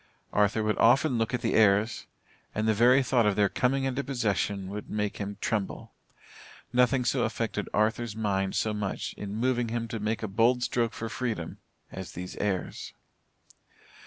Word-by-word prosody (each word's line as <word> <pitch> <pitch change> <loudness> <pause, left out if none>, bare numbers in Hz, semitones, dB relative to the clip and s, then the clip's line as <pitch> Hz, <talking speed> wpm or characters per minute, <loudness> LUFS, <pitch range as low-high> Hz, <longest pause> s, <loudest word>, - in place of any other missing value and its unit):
Arthur 105 +1 +2
would 110 0 0
often 125 +2 +4
look 115 -1 0
at 125 - -1
the 115 - 0
heirs, 105 +1 +3 0.5
and 110 +1 0
the 110 - +4
very 125 +5 +5
thought 120 -4 +2
of 105 - +2
their 105 0 +4
coming 135 +5 +1
into 135 +1 -1
possession, 105 -7 -1
would 105 +1 -6
make 105 -1 -2
him 100 0 -5
tremble. 105 -4 -2 0.8
Nothing 125 +1 +3
so - - +1
affected - - -2
Arthur's 110 +1 0
mind 95 -3 -1
so 110 - 0
much 105 -2 -3
in 100 0 -6
moving 120 +1 +1
him 115 0 -2
to 115 -1 -4
make 110 +2 -2
a - - -1
bold 115 +5 +2
stroke 115 -2 0
for 115 - -5
freedom 110 -8 -4 0.3
as 95 -2 -7
these 90 +1 -7
heirs. 100 -3 -3
110 Hz, 170 wpm, -28 LUFS, 105-120 Hz, 0.8 s, very